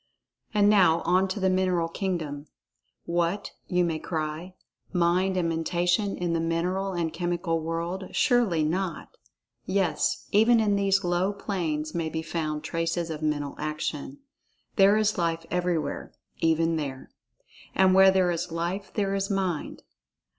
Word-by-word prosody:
And 205 -2 +3
now 180 -6 +5
on 185 +2 +2
to 190 +2 -4
the 190 - +2
mineral 185 -2 +1
kingdom. 160 -5 -3 0.6
"What," 170 +3 -1 0.2
you 180 -1 +2
may 165 -2 -1
cry, 160 +3 -4 0.4
"Mind 180 +1 +2
and 175 -2 +1
Mentation 175 +4 0
in 175 -1 -1
the 165 - +1
mineral 180 +4 -1
and 170 -2 -2
chemical 175 -1 -1
world—surely 175 +3 0
not?" 170 +2 -2 0.5
Yes, 185 -5 0
even 225 +3 +5
in 210 -2 +2
these 195 -1 +2
low 175 +2 +1
planes 165 -7 -3
may 165 -2 -1
be 160 +1 -4
found 155 -2 -3
traces 165 +1 -2
of 155 -1 -5
mental 145 -2 -1
action. 155 - -4 0.6
There 200 +1 +6
is 210 -2 +1
Life 165 -1 -1
everywhere—even 165 -1 -1
there. 135 -3 -5 0.6
And 190 -1 +5
where 190 0 +7
there 190 -2 +3
is 175 0 -3
Life 175 +4 -3
there 200 -2 0
is 195 0 -1
Mind. 190 -5 -2
175 Hz, 140 wpm, -27 LUFS, 165-190 Hz, 0.6 s, where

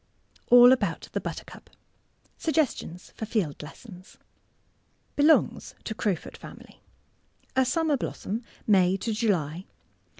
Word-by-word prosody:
ALL 245 0 +9
ABOUT 205 -10 0
THE - - -2
BUTTERCUP - - -8 0.7
SUGGESTIONS 290 - -1
FOR 220 - -5
FIELD 195 -10 -1
LESSONS 185 +4 -12 1.0
Belongs 300 +2 +3
to 220 - -4
crowfoot 205 -4 -3
family. - - -13 0.7
A 260 0 +4
summer 305 +3 +1
blossom— 225 -2 -4 0.2
May 190 -2 +4
to 225 +3 -3
July. 185 -6 -1
215 Hz, 105 wpm, -27 LUFS, 180-250 Hz, 1.0 s, ALL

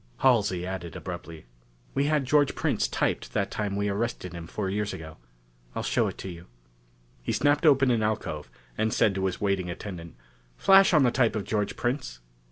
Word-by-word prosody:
Halsey 105 -9 +3
added 90 -4 -5
abruptly: 80 -4 -7 0.5
"We 140 - +1
had 150 -2 +1
George 145 +1 +3
Prince - - 0
typed - - -1
that 100 +1 0
time 105 -2 -2
we 100 0 0
arrested 100 -3 -2
him 85 -1 -7
four 100 +3 -3
years 105 +2 -2
ago. 80 -1 -9 0.6
I'll - - -2
show - - +1
him - - -3
to - - -8
you." 85 -1 -9 0.7
He - - -2
snapped 145 +3 +3
open 135 -3 +5
an 115 -2 +2
alcove, 90 - -2 0.3
and 110 0 0
said 105 - +3
to 95 0 -1
his 95 - -4
waiting 100 -3 0
attendant 85 -2 -7 0.4
"Flash 195 0 +6
on 150 - +6
the 125 - +4
type 120 -3 +2
of 105 - -1
George 105 -1 -1
Prince." 120 - -2
105 Hz, 185 wpm, -27 LUFS, 90-125 Hz, 0.7 s, Flash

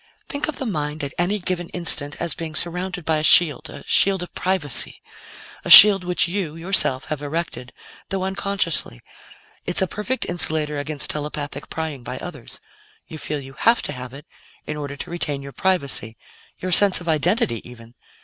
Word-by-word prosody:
"Think 285 +1 -3
of 310 - -4
the 265 - -5
mind 150 -7 -3
at 140 - -5
any 185 +4 +1
given 175 -2 -4
instant 150 -4 -2
as 170 -1 -2
being 160 -1 -7
surrounded 180 0 -4
by 160 -1 +1
a 155 - -2
shield 155 -1 +5
a - - -10
shield 190 -2 +3
of 180 - -11
privacy 180 -9 0 0.6
a - - -6
shield 200 -3 +11
which 180 0 +1
you, 175 -4 -3
yourself 165 -6 +1
have 150 -2 -4
erected, 145 -4 -5 0.4
though 195 -1 -2
unconsciously. 190 - -2 0.7
It's - - +2
a - - +2
perfect 210 +7 -4
insulator 155 -4 -1
against 145 0 -3
telepathic 145 -1 -5
prying 160 -4 -5
by 125 +2 -7
others. 145 -8 -9 0.5
You 155 - -9
feel 150 0 -4
you 135 -1 -11
have 230 - +2
to - - -3
have 125 -1 -8
it 140 +2 -12 0.4
in 150 - -5
order 145 -1 -6
to 145 - -6
retain 145 -5 -3
your 140 - -9
privacy 140 - -2 0.4
your 185 - -5
sense 195 +2 +6
of 175 - -11
identity, 160 - +1
even. 115 -1 -14
160 Hz, 180 wpm, -21 LUFS, 145-185 Hz, 0.7 s, shield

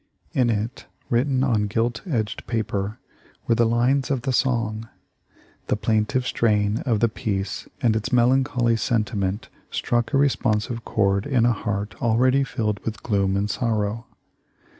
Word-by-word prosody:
In 125 -2 +2
it, 110 +3 -3 0.2
written 130 +2 +2
on 110 -6 +1
gilt 115 +2 -1
edged 110 - -2
paper, 110 -2 -2 0.5
were 115 - +3
the 115 0 +3
lines 125 +4 +2
of 135 -4 -1
the 130 - 0
song. 115 -4 0 0.8
The - - +1
plaintive 110 +4 0
strain 105 -3 +1
of 115 -4 +1
the 115 - +5
piece 100 -4 -3 0.2
and 115 -3 +3
its 110 - -2
melancholy 125 -1 +3
sentiment 105 -3 -1 0.2
struck 120 -1 -1
a 140 - +2
responsive 115 -4 +1
chord 100 0 +1
in 130 -5 +2
a 120 - +4
heart 105 -1 -3
already 130 +3 +3
filled 105 -6 -2
with 110 -2 -6
gloom 100 -3 +1
and 100 +1 0
sorrow. 110 0 -1
115 Hz, 145 wpm, -23 LUFS, 105-125 Hz, 0.8 s, the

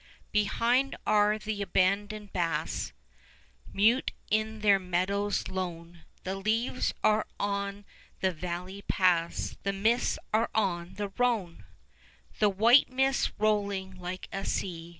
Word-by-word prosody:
Behind 235 +6 +2
are 210 0 +3
the 215 -1 -4
abandoned 200 +2 0
baths 170 -2 -1 0.8
5 - - -15
Mute 225 +6 +3 0.2
in 215 0 0
their 200 -2 +5
meadows 190 +3 -1
lone; 170 -2 -6 0.2
The 185 - -3
leaves 225 +6 0
are 215 0 +3
on 200 0 -2 0.3
the 190 - +1
valley 180 +3 -5
paths; 175 -4 +1
The 200 - -1
mists 225 +5 +1 0.2
are 225 +2 +2
on 180 -5 -1
the 205 -1 -3
Rhone 225 -9 0 0.7
The 210 - +5
white 230 +7 +5
mists 265 +1 +1
rolling 200 -3 0
like 180 +1 -6
a 195 - -4
sea. 170 -4 -3
200 Hz, 125 wpm, -29 LUFS, 185-215 Hz, 0.8 s, their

